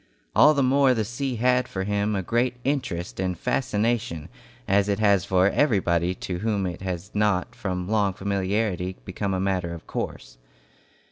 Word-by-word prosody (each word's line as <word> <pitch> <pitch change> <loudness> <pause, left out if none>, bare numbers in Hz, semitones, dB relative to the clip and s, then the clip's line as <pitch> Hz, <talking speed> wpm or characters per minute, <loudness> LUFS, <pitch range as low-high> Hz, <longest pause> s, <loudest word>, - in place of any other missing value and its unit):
All 150 - +7
the 140 - +2
more 135 0 +4
the 110 -2 0
sea 125 +4 -3
had 125 +2 +2
for 95 - -3
him 105 +1 0
a 95 - -1
great 120 +5 0
interest 100 -13 -2
and 90 -2 -1
fascination, 110 - -1 0.4
as 100 +1 +3
it 100 - +1
has 100 -3 +3
for 95 -1 +3
everybody 90 - +2
to 90 -1 -5
whom 105 -1 0
it 90 -1 -5
has 95 +1 -4
not 105 -3 +1
from 90 -3 -3
long 100 -2 +1
familiarity 95 -1 -1
become 95 +1 -2
a - - -1
matter 95 -3 -1
of 85 - -12
course. - - -6
100 Hz, 165 wpm, -25 LUFS, 90-115 Hz, 0.4 s, All